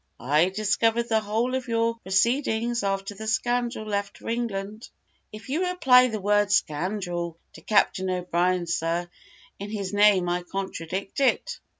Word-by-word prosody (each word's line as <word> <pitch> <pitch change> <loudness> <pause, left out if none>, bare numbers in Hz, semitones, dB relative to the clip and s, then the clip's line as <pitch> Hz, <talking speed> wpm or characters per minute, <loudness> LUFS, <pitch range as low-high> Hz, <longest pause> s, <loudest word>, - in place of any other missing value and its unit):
I 150 +8 +2
discovered 220 +4 +1
the 220 -1 +3
whole 220 +4 -1
of 260 -1 -2
your 230 0 +1
proceedings, 235 +3 +1
after 195 0 -2
the 220 +2 -8
scoundrel 240 +1 -1
left 200 -1 -3
for - - -8
England." 215 -2 -4 0.4
"If 215 +4 -11
you 340 +7 0
apply 260 -8 +5
the 220 -3 -4
word 205 +1 +2
scoundrel 175 -1 -1 0.2
to - - -13
Captain 190 -3 +2
O'Brien, 180 0 0
sir, 170 +1 -1 0.5
in 200 +1 -6
his 205 -2 -4
name 205 -3 +4
I 175 +1 0
contradict 190 +1 -5
it." 270 -2 +1
205 Hz, 145 wpm, -25 LUFS, 185-230 Hz, 0.5 s, apply